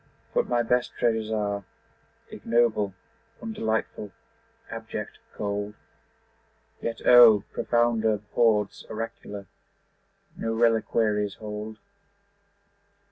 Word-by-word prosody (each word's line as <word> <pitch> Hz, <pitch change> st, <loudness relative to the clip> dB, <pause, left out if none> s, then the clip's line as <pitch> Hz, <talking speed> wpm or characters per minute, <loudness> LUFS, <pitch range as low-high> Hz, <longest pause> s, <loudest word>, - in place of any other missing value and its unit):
But -, -, +1 dB
my 120 Hz, -1 st, +2 dB
best 125 Hz, +1 st, +1 dB
treasures 110 Hz, -2 st, +1 dB
are 100 Hz, -2 st, -1 dB, 0.7 s
Ignoble, 110 Hz, -4 st, +1 dB, 0.4 s
undelightful, 110 Hz, -, -2 dB, 0.6 s
abject, 115 Hz, -2 st, -6 dB, 0.2 s
cold; 105 Hz, 0 st, -3 dB, 1.1 s
Yet 115 Hz, -1 st, -4 dB
O! 120 Hz, -4 st, +9 dB
profounder 115 Hz, -3 st, +2 dB
hoards 105 Hz, -4 st, +2 dB
oracular 105 Hz, -2 st, -6 dB, 0.9 s
No 115 Hz, 0 st, -2 dB
reliquaries 110 Hz, -3 st, +2 dB
hold. 105 Hz, 0 st, -6 dB
110 Hz, 80 wpm, -26 LUFS, 105-115 Hz, 1.1 s, O